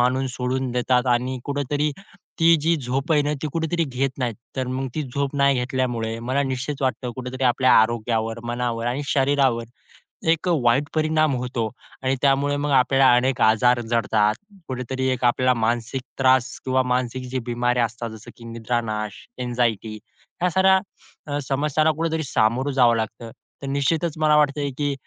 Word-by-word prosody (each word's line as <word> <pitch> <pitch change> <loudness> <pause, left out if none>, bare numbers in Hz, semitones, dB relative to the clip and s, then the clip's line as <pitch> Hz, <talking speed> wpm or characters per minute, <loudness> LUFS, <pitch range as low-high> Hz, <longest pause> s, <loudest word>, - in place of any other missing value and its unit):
मानून 130 +2 +2
सोडून 130 +1 -2
देतात 125 +1 +1
आणि 125 +2 -2
कुठेतरी, 145 +1 -1 0.5
ती 165 +1 +6
जी 165 +3 +2
झोप 135 +5 -1
आहे 150 - +4
ना, 145 +1 -1
ती - - -1
कुठेतरी 165 +1 0
घेत 135 -1 -3
नाहीत. 120 -3 -1 0.2
तर 130 - -1
मग 130 +1 -3
ती 155 - -1
झोप 140 +1 -3
नाही 140 0 +4
घेतल्यामुळे 120 -3 -2
मला 130 +4 -1
निश्चित 135 +1 -3
वाटतं 130 -1 -1
कुठेतरी 130 +1 -4
आपल्या 130 +1 +4
आरोग्यावर, 115 0 -1
मनावर 120 -1 -2
आणि 125 +4 -1
शरीरावर 135 -4 +2 0.7
एक 165 +2 +1
वाईट 135 -6 +3
परिणाम 155 -1 +2
होतो 120 -2 -2 0.4
आणि 130 +1 +1
त्यामुळे 140 +1 +2
मग 145 +1 -2
आपल्याला 135 +1 +5
अनेक 125 0 +1
आजार 120 +3 +4
जडतात. 110 -2 +2 0.3
कुठेतरी 130 +1 -2
आपल्याला 125 +1 +3
मानसिक 120 +2 -1 0.2
त्रास 130 -1 +3 0.2
किंवा 130 0 +2
मानसिक 125 0 -1
जे 130 - -1
बिमाऱ्या 120 0 +1
असतात 115 +1 -6
जसं 110 0 -11
की 120 - -14
निद्रानाश, 110 -2 -2 0.3
अँक्झायटी 120 -3 -1 0.5
ह्या 180 - +3
साऱ्या 190 -5 0
समस्यांना 150 +3 +2
कुठेतरी 160 -1 -1
सामोरं 130 +1 +1
जावं 125 -3 +4
लागतं. 110 +1 -4 0.3
तर 140 - -6
निश्चितच 150 +4 0
मला 155 -1 +3
वाटत, 150 -1 +2 0.2
की 145 -1 0
130 Hz, 155 wpm, -23 LUFS, 120-140 Hz, 0.7 s, ती